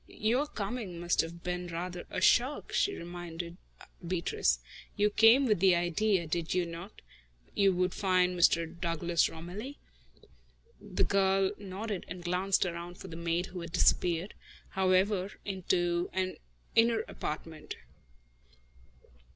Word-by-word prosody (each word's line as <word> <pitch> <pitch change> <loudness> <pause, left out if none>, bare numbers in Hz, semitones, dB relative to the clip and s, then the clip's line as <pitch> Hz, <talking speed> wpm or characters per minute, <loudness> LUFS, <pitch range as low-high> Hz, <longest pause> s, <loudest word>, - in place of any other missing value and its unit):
"Your 245 +7 0
coming 205 -6 -4
must 175 0 +2
have 170 +1 -8
been 180 0 -3
rather 175 +1 -5
a 185 - -3
shock," 255 +8 +3
she 400 - +2
reminded 175 0 -7 0.5
Beatrice. 185 - +1 0.4
"You 210 0 +2
came 225 +6 +6
with 215 -7 +2
the 185 -1 +5
idea, 175 +2 +1
did 165 +2 -2
you 180 -1 +2
not, 170 +5 -9 0.4
that - - -30
you 195 -1 +4
would 180 0 0
find 185 -2 +2
Mr. 170 -1 +4 0.2
Douglas 170 0 +1
Romilly?" 190 - -7 1.0
The - - -1
girl 195 0 +3
nodded 200 0 -5
and 180 -1 -7
glanced 185 +2 +1
around 175 0 -5
for 190 - -9
the 165 - -8
maid, 170 +1 -1
who 180 - -5
had 170 0 -8
disappeared, 180 0 +2 0.4
however, 190 +1 +2
into 175 -3 0
an 185 0 -1 0.4
inner 225 -1 +4
apartment. 155 -5 -6
180 Hz, 135 wpm, -31 LUFS, 170-200 Hz, 1.0 s, came